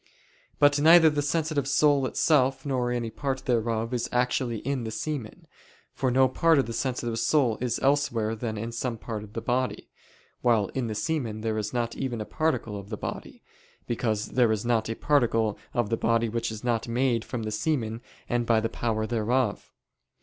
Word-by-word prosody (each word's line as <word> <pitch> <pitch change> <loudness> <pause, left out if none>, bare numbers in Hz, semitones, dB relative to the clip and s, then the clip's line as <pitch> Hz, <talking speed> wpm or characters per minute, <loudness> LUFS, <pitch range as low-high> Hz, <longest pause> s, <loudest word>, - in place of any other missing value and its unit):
But 145 0 +4
neither 160 0 +7
the 150 -1 0
sensitive 145 -1 -1
soul 140 -1 +3
itself 135 -3 +2
nor 130 -3 0
any 120 -2 -2
part 135 0 -3
thereof 115 -1 0
is 120 - -1
actually 125 -1 0
in 135 -2 -1
the 110 - -4
semen, 115 +2 -5 0.5
for 130 - 0
no 130 +1 +4
part 165 +5 +3
of 135 - +3
the 115 - -5
sensitive 120 -2 -2
soul 130 -8 +2
is 125 -2 0
elsewhere 125 -6 +1
than 110 -1 -4
in 115 +3 -4
some 115 0 -3
part 110 -1 -5
of 105 0 -13
the 115 - -5
body; 125 +1 -1 0.5
while 115 -5 +2
in 130 -3 -2
the 110 - -4
semen 110 -2 -2
there 110 -1 -1
is 105 0 -3
not 120 -2 -2
even 125 -4 -3
a 105 - -4
particle 115 -10 -1
of 100 0 -11
the 110 - -4
body, - - -7 0.4
because 110 -3 -1
there 120 -3 +3
is 110 +1 -1
not 115 -2 +1
a 115 - -2
particle 115 -7 +1
of 120 -3 -1
the 115 - +2
body 115 0 +1
which 115 0 -2
is 110 +1 -8
not 115 -2 0
made 120 -1 +1
from 120 -3 -5
the 110 - -3
semen 115 -1 -1 0.3
and 120 -1 -1
by 115 -2 +4
the 115 +1 -1
power 110 -2 -1
thereof. 120 0 -1
120 Hz, 195 wpm, -27 LUFS, 110-135 Hz, 0.5 s, neither